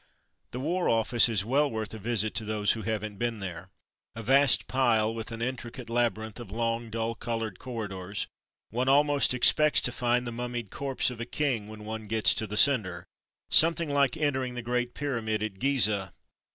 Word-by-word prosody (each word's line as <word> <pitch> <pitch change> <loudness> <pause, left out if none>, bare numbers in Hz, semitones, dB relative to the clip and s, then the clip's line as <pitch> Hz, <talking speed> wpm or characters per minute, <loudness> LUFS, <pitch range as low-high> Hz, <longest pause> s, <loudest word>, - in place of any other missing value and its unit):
The 125 - -6
War 175 +6 0
Office 115 +1 +3
is 105 -4 +1
well 140 +5 +2
worth 110 -3 -4
a 110 - -7
visit 110 0 -1
to 110 - -3
those 105 -1 +1
who 115 - -3
haven't 110 -2 -3
been 120 -2 -2
there. 90 -1 -7 0.5
A 115 - -6
vast 135 +3 +4
pile 115 -4 +2
with 115 0 -6
an 115 0 -5
intricate 120 -1 -6
labyrinth 115 -2 -1
of 120 - -9
long, 115 +1 -2
dull 115 +1 -2
coloured 115 -3 -4
corridors 100 -6 -5 0.2
— - - -66
one 125 +4 0
almost 145 +1 +4
expects 150 +4 +5
to 125 - 0
find 125 0 0
the 120 - -4
mummied 120 -2 -5
corpse 135 -2 -1
of 120 -2 -8
a - - -3
king 125 -7 -1
when 110 0 -10
one, 110 0 -6
gets 110 0 +3
to 110 - -1
the 105 +1 -4
centre 105 -11 +3 0.3
— - - -66
something 165 0 +4
like 140 +2 +2
entering 130 -5 -1
the 125 - -5
Great 125 0 -2
Pyramid 115 -7 -2
at 100 -3 -5
Gizeh. 110 -8 +1
115 Hz, 190 wpm, -28 LUFS, 110-130 Hz, 0.5 s, expects